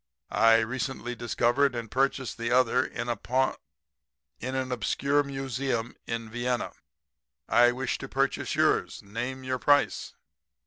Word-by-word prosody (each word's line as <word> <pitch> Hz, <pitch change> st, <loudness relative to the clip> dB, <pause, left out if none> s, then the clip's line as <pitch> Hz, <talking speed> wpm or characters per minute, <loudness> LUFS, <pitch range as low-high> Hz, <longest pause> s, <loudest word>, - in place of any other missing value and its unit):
I 115 Hz, 0 st, +7 dB
recently 125 Hz, +1 st, -3 dB
discovered 120 Hz, +3 st, +1 dB
and 115 Hz, -2 st, -5 dB
purchased 135 Hz, -2 st, 0 dB
the 115 Hz, 0 st, -1 dB
other 125 Hz, 0 st, +4 dB
in 120 Hz, -2 st, -5 dB
a 120 Hz, -, 0 dB
pawn 130 Hz, +4 st, +1 dB, 0.9 s
in 130 Hz, +2 st, -4 dB
an 130 Hz, -1 st, -2 dB
obscure 140 Hz, +5 st, +1 dB
museum 135 Hz, -3 st, -3 dB
in 115 Hz, -1 st, -3 dB
Vienna. 120 Hz, +2 st, -2 dB, 0.8 s
I 120 Hz, 0 st, +5 dB
wish 130 Hz, 0 st, -2 dB
to -, -, -7 dB
purchase -, -, 0 dB
yours. -, -, +1 dB
Name 125 Hz, +6 st, -5 dB
your 130 Hz, 0 st, -2 dB
price.' 145 Hz, +1 st, +2 dB
125 Hz, 135 wpm, -28 LUFS, 115-130 Hz, 0.9 s, I